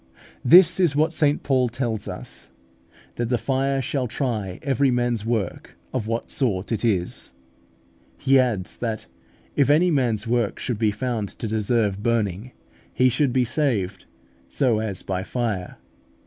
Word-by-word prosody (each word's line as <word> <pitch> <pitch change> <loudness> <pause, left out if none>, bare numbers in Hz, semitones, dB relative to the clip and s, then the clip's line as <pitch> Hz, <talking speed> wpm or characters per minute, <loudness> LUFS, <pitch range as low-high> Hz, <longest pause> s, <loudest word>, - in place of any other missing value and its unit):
This 170 +4 +7
is 170 -6 +3
what 155 +2 +2
St 150 -3 +1
Paul 130 -3 +2
tells 115 -3 -3
us, - - -7 0.7
that 120 -1 -1
"the 125 - +2
fire 135 +3 0
shall 130 0 -1
try 110 -7 -3
every 140 0 +2
man's 120 -3 0
work 110 -6 -3 0.2
of 120 -5 -2
what 115 +1 -3
sort 105 -7 -1
it 110 -1 -1
is;" 95 - -1 0.8
he 135 0 +4
adds, 115 -8 -1
that 110 -6 -3 0.5
if 140 -1 +3
any 170 +5 +4
man's 120 -7 +1
work 115 -2 0
should 120 -5 -3
be 110 -2 +3
found 105 -1 -2
to 115 - -6
deserve 105 -2 0
burning, 110 -1 -1 0.4
he 130 0 +3
should 140 +1 +1
be 125 0 +2
saved 105 - -1 0.4
"so 125 -6 +1
as 105 -4 -4
by 95 -1 -2
fire" 110 -1 -2
(1 90 - -10
Cor. - - -21
120 Hz, 160 wpm, -23 LUFS, 105-135 Hz, 0.8 s, This